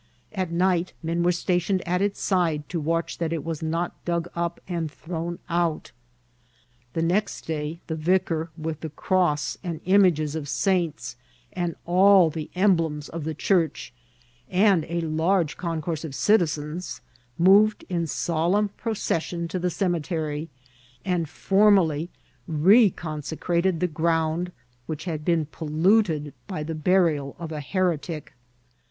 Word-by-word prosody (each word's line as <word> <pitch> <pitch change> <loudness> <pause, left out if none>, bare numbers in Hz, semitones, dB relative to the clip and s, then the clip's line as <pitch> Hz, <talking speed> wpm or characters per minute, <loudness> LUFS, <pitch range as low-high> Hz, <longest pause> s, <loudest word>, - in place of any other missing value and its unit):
At 185 -4 -2
night 180 0 +1
men 165 +1 -1
were 175 +1 +3
stationed 180 +1 0
at 180 +1 +1
its 200 0 0
side 165 -6 0
to 175 - -2
watch 165 +2 -1
that 165 -2 -1
it 165 -3 -2
was 165 -2 -4
not 165 +2 -3
dug 170 -1 -1
up 170 0 -2
and 170 -3 -2
thrown 170 +2 -5
out. 170 -2 -1 1.0
The 165 - 0
next 195 +5 0
day 160 +1 -4
the 160 - -4
vicar, 165 0 0
with 160 -1 -4
the 160 - -5
cross 155 -1 0
and 170 -4 -4
images 180 -6 +4
of 155 -3 -4
saints, 170 -9 0 0.4
and 175 -2 -2
all 185 -1 +6
the 155 -1 -5
emblems 165 -6 +1
of 165 -2 -5
the 160 -1 -3
church, 165 -5 0 0.6
and 190 -3 +3
a 170 +1 -2
large 165 +1 +1
concourse 165 -2 -3
of 150 -4 -6
citizens, 165 -4 0 0.4
moved 205 +4 +5
in 170 -2 -1
solemn 175 +7 +1
procession 175 -6 -2
to 185 - -2
the 180 +1 0
cemetery, 165 -4 -2 0.6
and 175 -5 0
formally 190 -5 +3 0.4
recon 165 -2 +3
secrated 170 +3 0
the 180 - +1
ground 165 +1 0 0.4
which 155 +1 -5
had 155 -4 -3
been 165 -1 +1
polluted 160 0 +1
by 175 -6 -4
the 160 +2 -4
burial 155 -4 +1
of 165 -3 -6
a 150 -1 -4
heretic. 165 -1 -2
170 Hz, 140 wpm, -25 LUFS, 155-180 Hz, 1.0 s, all